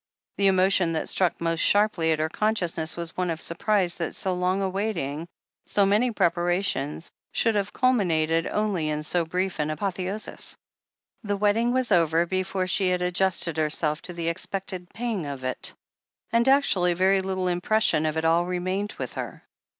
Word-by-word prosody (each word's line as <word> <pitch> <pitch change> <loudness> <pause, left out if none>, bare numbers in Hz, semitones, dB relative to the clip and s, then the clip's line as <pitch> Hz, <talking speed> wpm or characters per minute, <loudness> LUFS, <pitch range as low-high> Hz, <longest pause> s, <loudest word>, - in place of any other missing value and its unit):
The 200 - +3
emotion 185 -2 +3
that 160 - -2
struck 185 -3 +1
most 165 -1 -1
sharply 205 -6 +3
at 160 - +2
her 155 +1 0
consciousness 175 -4 -1
was 170 -1 -4
one 180 -1 -1
of 165 -1 -2
surprise 180 +1 +1
that 170 - -3
so 190 - -1
long 180 +1 0
a 195 - 0
waiting, 170 -6 -3 0.4
so 200 - +3
many 210 +6 +3
prepara 175 -3 +1
tions, 150 0 -2 0.2
should 225 - +2
have 205 -1 -1
culminated 165 -10 +1
only 200 -7 -1
in 150 0 -2
so 170 +2 +1
brief 180 +2 -2
an 150 0 0
apotheosis. 190 +5 -3 0.7
The 205 -1 -1
wedding 210 +4 +2
was 255 -1 +1
over 165 0 +3
before 185 +1 -1
she 185 +1 +2
had 180 0 0
adjusted 180 -2 0
her 155 -1 +1
self 150 0 0
to 180 - -9
the 170 -1 -2
expected 185 +1 -4
pang 220 -9 -3
of 140 -2 -6
it, 130 0 -1 0.6
and 235 +2 +2
actually 190 -11 +3
very 190 +2 +3
little 190 -1 -2
impression 175 -2 +2
of 155 0 -2
it 160 - -1
all 170 +2 +3
remained 185 +3 -2
with - - -6
her. - - -6
180 Hz, 175 wpm, -25 LUFS, 165-200 Hz, 0.7 s, The